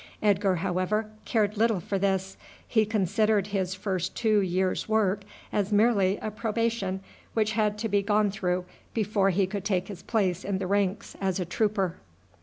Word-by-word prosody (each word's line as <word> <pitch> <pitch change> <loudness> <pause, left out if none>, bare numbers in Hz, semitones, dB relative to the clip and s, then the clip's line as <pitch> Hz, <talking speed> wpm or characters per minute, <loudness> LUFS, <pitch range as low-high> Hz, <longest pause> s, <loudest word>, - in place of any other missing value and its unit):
Edgar, 200 -2 +3
however, 190 +5 -1
cared 215 -2 +1
little 225 -2 +3
for 195 +3 -2
this. 190 0 0 0.3
He 220 -2 +2
considered 210 0 +2
his 190 -2 -2
first 185 -2 -2
two 215 -3 +3
years' 185 +1 0
work 210 -2 +2 0.3
as 205 0 0
merely 205 -2 +3
a 215 - -2
probation 220 -3 -1 0.3
which 215 -1 +2
had 210 -1 +1
to 225 +1 -2
be 200 -1 +2
gone 205 0 +2
through 180 -3 -1 0.3
before 210 -3 +2
he 195 +1 +2
could 195 +1 -4
take 190 -2 0
his 190 -4 -7
place 190 -5 0
in 195 -1 -1
the 190 - -3
ranks 200 +1 0
as 190 -1 0
a 180 - -1
trooper. 190 0 0
200 Hz, 170 wpm, -27 LUFS, 190-215 Hz, 0.3 s, Edgar